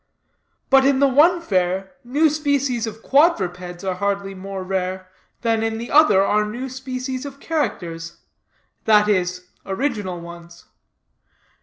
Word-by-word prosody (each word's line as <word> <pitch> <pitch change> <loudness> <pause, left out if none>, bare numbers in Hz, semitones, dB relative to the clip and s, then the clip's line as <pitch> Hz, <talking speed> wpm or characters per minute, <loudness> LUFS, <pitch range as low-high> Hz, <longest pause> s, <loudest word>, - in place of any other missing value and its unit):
But 270 0 +7
in 275 0 +3
the 280 +1 +4
one 320 +6 +4
fair, 190 - -1
new 285 +6 +2
species 280 -6 0
of 220 +1 -8
quadrupeds 180 - +1
are 190 -1 -1
hardly 200 +1 -2
more 195 0 -6
rare, 185 0 -3 0.3
than 225 -1 +1
in 225 0 -1
the 235 +2 -6
other 280 -11 +6
are 210 +1 +2
new 240 +5 -5
species 255 0 -5
of 280 -1 -9
characters 170 - -3 0.7
that 210 -1 +5
is, 180 -2 -1
original 200 -4 -3
ones. 170 0 -12
210 Hz, 135 wpm, -21 LUFS, 185-265 Hz, 0.7 s, But